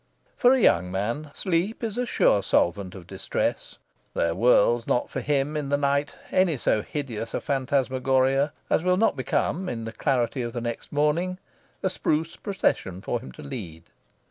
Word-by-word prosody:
For 245 - +5
a 265 - +3
young 90 - +3
man, 115 +11 -2
sleep 190 +5 -1
is 220 -2 -2
a 250 0 -1
sure 100 - +3
solvent 95 +1 +1
of 90 -3 -10
distress. - - -3 0.4
There 85 0 +1
whirls 120 +2 +3
not 120 - 0
for - - -3
him 145 +1 0
in 145 -2 -2
the 145 - +2
night 140 0 0 0.2
any 185 -5 +3
so 110 -3 +1
hideous 115 -4 -5
a - - 0
phantasmagoria 135 0 +1 0.2
as - - +2
will 180 0 +3
not 225 -5 +3
become, 175 +7 -1
in 115 -1 -4
the 115 - -5
clarity 125 +1 0
of 120 0 -4
next 120 -1 -4
morning, 150 +5 +1 0.5
a 190 - +2
spruce 160 -2 -1
procession 95 - -1
for 120 - -2
him 130 - -10
to 155 - -11
lead. 100 - -7
135 Hz, 170 wpm, -26 LUFS, 115-155 Hz, 0.5 s, For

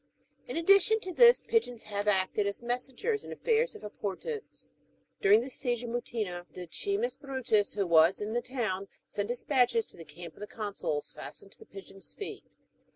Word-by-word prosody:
In - - -4
addition 395 +5 +5
to 370 -2 -5
this, 475 +5 +7
pigeons 245 - 0
have 205 0 -3
acted 200 +1 +2
as 200 +4 -4
messengers 260 - -1
in - - -10
aftairs 470 +1 +1
of - - -11
importance. 210 - -5 0.5
During 205 +3 +6
the 255 - -5
siege 245 -2 -1
of 235 - -5
Mutina, 215 -7 -3
Decimus 400 - -2
Erutus, 260 -8 0
who 200 -2 +1
Avas 170 +1 +5
in 210 +1 -3
the 240 - +1
town, 230 -7 -2 0.2
sent 205 0 -3
despatches 255 - +2
to - - -16
the 165 - -9
camp 165 +2 -10
of - - -19
the 210 - -6
consuls^'' 200 -10 -3
fastened 195 - -9
to - - -15
pigeons' 195 0 -10
feet. 410 - -7
230 Hz, 170 wpm, -30 LUFS, 195-320 Hz, 0.5 s, this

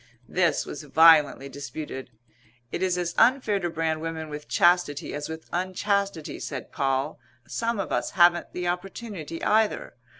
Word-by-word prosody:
This 175 -5 +1
was 150 - -7
violently 150 -2 +5
disputed. 140 -1 -7 0.6
"It - - -3
is 185 -1 +1
as 175 -1 -2
unfair 230 -4 +4
to 175 -2 -2
brand 160 -1 -1
women 160 -1 -4
with 150 0 -7
chastity 175 -3 +2
as 145 +1 -4
with 160 0 -7
unchastity," 185 -1 -1
said 135 -3 -6
Poll. 135 +2 -1 0.3
"Some 230 - -2
of 195 - -3
us - - 0
haven't 175 -1 +5
the 180 0 -3
opportunity 180 -2 -5
either. 215 0 +1
170 Hz, 145 wpm, -26 LUFS, 150-185 Hz, 0.6 s, violently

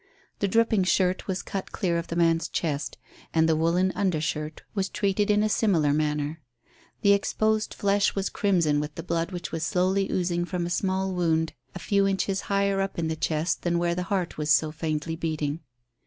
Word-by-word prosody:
The 200 - +1
dripping 225 -1 +3
shirt 185 0 +1
was 190 -1 -2
cut 195 - -5
clear 175 -5 0
of 170 - -6
the 170 - -4
man's 165 -1 +2
chest, 150 -4 -2 0.4
and 160 0 +4
the 160 - +3
woollen 170 +4 +2
under 185 -6 0
shirt 155 0 -3
was 195 -2 -1
treated 200 +1 0
in 210 0 +4
a - - +3
similar 175 -10 +2
manner. 150 +1 -1 0.6
The 200 -1 +6
exposed 215 +2 0
flesh 200 0 +2
was 195 0 0
crimson 170 -8 +2
with 150 0 -4
the 165 - -6
blood 170 +2 -1
which 175 -1 -5
was 165 0 -3
slowly 190 +3 +1
oozing 175 -1 0
from 175 -1 -2
a 175 - -4
small 190 0 0
wound 160 -2 +1 0.2
a - - -3
few 200 -1 +2
inches 195 0 0
higher 200 -1 +2
up 195 - -3
in 165 -1 -1
the 160 - -1
chest 160 +1 -1
than 175 -1 0
where 170 0 +1
the 180 - -2
heart 185 -6 -1
was 150 0 -2
so 155 +2 +4
faintly 155 0 -3
beating. 155 -2 -2
175 Hz, 200 wpm, -26 LUFS, 160-195 Hz, 0.6 s, The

